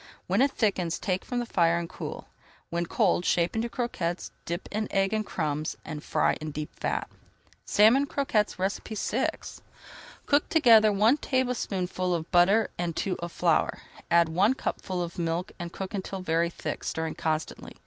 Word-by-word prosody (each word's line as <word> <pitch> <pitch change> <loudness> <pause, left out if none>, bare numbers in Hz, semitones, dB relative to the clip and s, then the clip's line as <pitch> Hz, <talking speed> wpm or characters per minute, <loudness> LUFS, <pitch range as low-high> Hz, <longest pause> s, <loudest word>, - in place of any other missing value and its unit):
When 195 +6 +2
it 275 - +5
thickens, 195 -9 0
take 185 -1 -2
from 245 - -4
the 240 - 0
fire, 170 -6 +2
and 170 0 -3
cool. - - -7 0.5
When 170 0 -1
cold, 175 - +2
shape 175 +1 +1
into 230 +1 -1
croquettes, 185 -9 -3
dip 170 +2 -4
in 215 0 -1
egg 195 +1 +1
and 215 0 +1
crumbs, 155 -5 -2
and 155 -2 -6
fry - - +2
in 155 - -4
deep 150 0 -5
fat. - - -1 0.6
SALMON 230 +7 +5
CROQUETTES 230 -8 0 0.3
VI 230 +6 0 1.0
Cook 285 +1 +2
together 225 -9 +6
one 215 +7 +4
tablespoonful 195 - -1
of 160 -1 -5
butter 195 +5 +4
and 170 -2 -2
two 195 - -1
of 170 0 -5
flour. 170 -2 +1 0.3
Add 170 -1 +4
one 195 +10 +3
cupful 185 -8 -3
of 170 +1 -7
milk 170 +2 -1
and 170 -1 -5
cook 190 0 -6
until 195 -1 -4
very 170 -1 +1
thick, - - -5
stirring 160 0 -2
constantly. 155 0 -3
185 Hz, 165 wpm, -27 LUFS, 170-220 Hz, 1.0 s, together